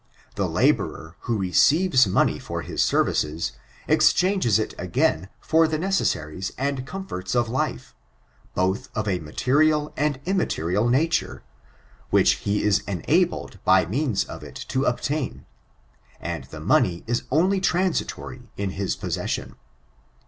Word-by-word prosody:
The - - -1
laborer, 80 +1 0
who 115 - +2
receives 130 - +4
money 95 - +2
for - - -5
bis - - 0
services, 75 -3 0 0.4
exchanges 180 - +3
it 110 - -2
again 100 - 0
for 160 0 +3
the 155 0 -1
necessaries 95 - -1
and 135 -1 -2
comforts 135 - -5
of 120 -1 +2
life, 90 - -2 0.6
both 95 +7 0
of 110 0 -1
a 95 -3 0
material 150 - +1
and 145 -2 0
immaterial 115 - 0
nature, 160 +7 0 0.7
which - - +4
he 105 - +1
is 105 -1 +3
enabled 150 - 0
by 95 -1 +5
means 115 - 0
of - - -9
it - - -11
to 135 +1 0
obtain; 135 +4 -2 0.7
and - - -5
the - - -10
money 85 -1 +2
is 120 +1 -1
only 185 +7 +2
transitorily 175 -8 -1
in 100 -1 -2
his 95 0 -2
possession." - - -3
125 Hz, 130 wpm, -24 LUFS, 95-155 Hz, 0.7 s, by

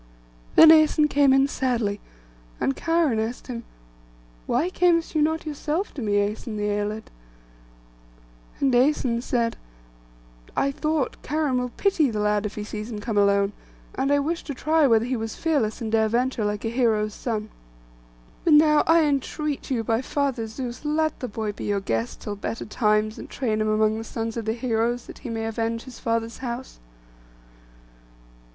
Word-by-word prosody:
Then 320 - +10
Æson 310 -1 +5
came 280 -1 +4
in 270 +1 +5
sadly, 235 -7 -1 0.6
and 270 - 0
Cheiron 330 -8 +1
asked 225 +3 -3
him, 240 -2 -6 0.8
'Why 310 +10 +1
camest 345 -3 +2
you 310 - +2
not 320 +2 0
yourself 310 +5 -3
to 280 - -6
me, 210 -3 -1
Æson 210 +2 -1
the 210 - -2
Æolid?' 210 +1 -2 1.5
And 270 -2 +2
Æson 245 -2 +2
said— 235 -2 -1 1.0
'I 275 - +2
thought, 305 0 -1
Cheiron 295 -4 0
will 250 0 -2
pity 360 -8 +2
the 215 -2 -3
lad 210 0 +1
if 205 - -10
he 210 - -4
sees 215 +1 -6
him 220 - -5
come 220 +1 -4
alone; 200 0 +3 0.4
and 275 - 0
I 285 - +5
wished 320 +4 -2
to 285 - -4
try 310 +3 +3
whether 225 -2 +3
he 255 +1 -1
was 225 -2 -4
fearless, 270 -9 0
and 220 -1 -3
dare 220 -1 +3
venture 245 +1 0
like 210 +1 -2
a - - 0
hero's 220 -3 +1
son. 220 -2 -4 0.9
But 330 - +4
now 300 0 +6
I 330 0 +5
entreat 290 0 -2
you 245 -4 0
by 225 +2 0
Father 265 -4 -1
Zeus, 240 +3 -6
let 310 +1 0
the 250 - -4
boy 215 -1 -3
be 205 - -7
your 205 -1 0
guest 115 -9 -3
till 205 - -4
better 215 +3 -5
times, 215 -1 +1
and - - -9
train 220 -5 -1
him 215 - +1
among 215 0 +2
the - - -5
sons 225 0 -4
of 230 -2 -4
the 220 - 0
heroes, 235 0 -1
that - - -11
he - - -7
may 225 -1 -3
avenge 225 +1 -2
his 260 -2 -11
father's 230 0 -2
house. 250 0 -6
235 Hz, 175 wpm, -24 LUFS, 215-285 Hz, 1.5 s, Then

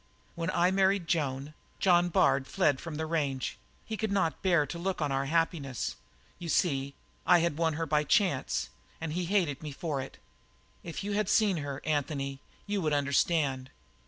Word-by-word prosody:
"When 165 0 -3
I 175 +1 +3
married 195 -1 +2
Joan, 145 -3 -1 0.3
John 175 -2 +4
Bard 140 -4 +3
fled 145 -9 +1
from 165 -3 -6
the 160 +1 -2
range; 145 -5 -2 0.3
he 220 - -4
could 220 -2 -2
not 190 -5 0
bear 170 -6 +3
to 170 - -6
look 190 +2 -2
on 150 -3 0
our 135 0 0
happiness. 160 -5 -1 0.4
You 170 -2 -6
see, 140 -5 +1 0.3
I 175 - +6
had 170 -2 -1
won 165 -1 +2
her 165 +2 -2
by 150 -1 +2
chance, 175 - +1 0.3
and 160 -1 -4
he 180 +1 -1
hated 170 -7 +1
me 150 -2 -5
for 145 -1 -3
it. 135 - -9 0.6
If 170 +3 -6
you 205 - -3
had 205 0 0
ever - - -3
seen 205 -5 +3
her, 145 -2 -4
Anthony, 140 -2 -1 0.3
you 205 -1 -1
would 155 -3 0
understand. 140 -2 +1
160 Hz, 185 wpm, -30 LUFS, 140-180 Hz, 0.6 s, I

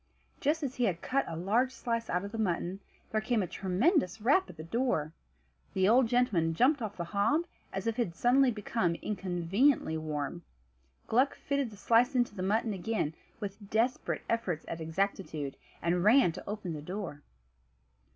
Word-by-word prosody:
Just 305 +2 +1
as 265 -3 -2
he 245 - +2
had 175 -5 -1
cut 275 +1 +1
a 165 - -4
large 220 +10 +1
slice 230 -3 -3
out 180 +2 0
of 200 - -7
the 225 - -5
mutton 185 -2 -1 0.3
there 215 - +1
came 220 -1 +1
a - - -3
tremendous 195 - +1
rap 285 - +3
at 165 - -11
the 155 - -7
door. 165 - 0 0.6
The 190 0 +3
old 240 +3 +5
gentleman 200 -10 +2
jumped 265 - +3
off 210 -2 -4
the 170 - -2
hob, 205 - +1 0.3
as 195 - -4
if 230 +1 -1
it 240 - +3
had 170 - -11
suddenly 255 +5 +4
become 210 -5 -1
inconveniently 185 - +1
warm. 150 +1 -3 0.6
Gluck 255 +5 +2
fitted 280 -3 -1
the 210 - -13
slice 240 +6 +3
into 245 -3 +2
the 195 - -6
mutton 215 +3 +1
again, 190 -4 -1 0.3
with 200 -1 -7
desperate 235 +4 0
efforts 190 -9 -1
at 165 0 -5
exactitude, 160 -4 -2 0.3
and 175 +1 +1
ran 220 -2 +6
to 165 - -9
open 205 -5 -4
the 150 - -5
door. 175 -3 -5
205 Hz, 180 wpm, -31 LUFS, 175-245 Hz, 0.6 s, ran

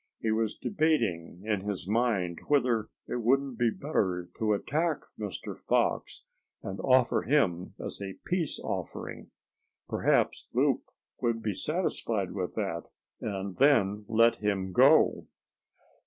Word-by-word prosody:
He 110 - 0
was 110 0 0
debating 115 - 0
in 105 -3 0
his 100 -3 -4
mind 105 -6 +1
whether 125 -6 +2 0.2
it - - -2
wouldn't 135 +1 +1
be 120 -1 +4
better 95 - -1
to 110 -1 +2
attack 155 +9 0 0.2
Mr. 105 -3 -5
Fox, - - 0 0.4
and 95 0 -5
offer 130 -2 +3
him 100 - +1
as - - -5
a 95 -1 -6
peace 175 -4 -1
offering. - - -5 0.6
Perhaps - - +1
Loup - - +2 0.4
would 115 -2 0
be 105 - 0
satisfied 115 - -1
with 90 -3 -4
that, 95 -6 -2 0.3
and 100 -2 -4
then 105 -7 +3
let 115 +1 +4
him 100 -3 -1
go. - - +5
110 Hz, 125 wpm, -29 LUFS, 95-130 Hz, 0.6 s, go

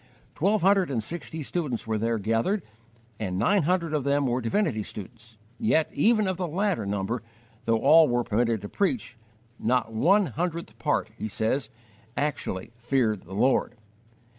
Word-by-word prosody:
Twelve 200 +3 +1
hundred 195 -2 +4
and 120 -5 -1
sixty 160 +3 -5
students 140 -6 -2
were 110 -1 -1
there 115 +1 0
gathered, 115 - 0 0.6
and 95 -4 -2
nine 195 - +3
hundred 170 0 0
of 150 -3 0
them 140 +1 +2
were 125 0 0
divinity 115 - 0
students, 110 +2 -9 0.2
yet 200 -8 +2
even 215 -3 +3
of 185 -2 -1
the 180 -2 -2
latter 185 - -1
number, 100 +4 -2 0.4
though 115 0 +3
all 155 +6 +6
were 120 -1 +1
permitted 115 -1 0
to - - -4
preach, 200 - -1 0.4
not 120 -1 0
one 200 - +4
hundredth 170 +3 -4
part, - - 0
he - - -2
says, 110 +7 -1 0.5
actually 120 -9 -2
"feared 120 -4 0
the 95 +3 -8
Lord." 125 +2 +2
130 Hz, 160 wpm, -26 LUFS, 110-175 Hz, 0.6 s, all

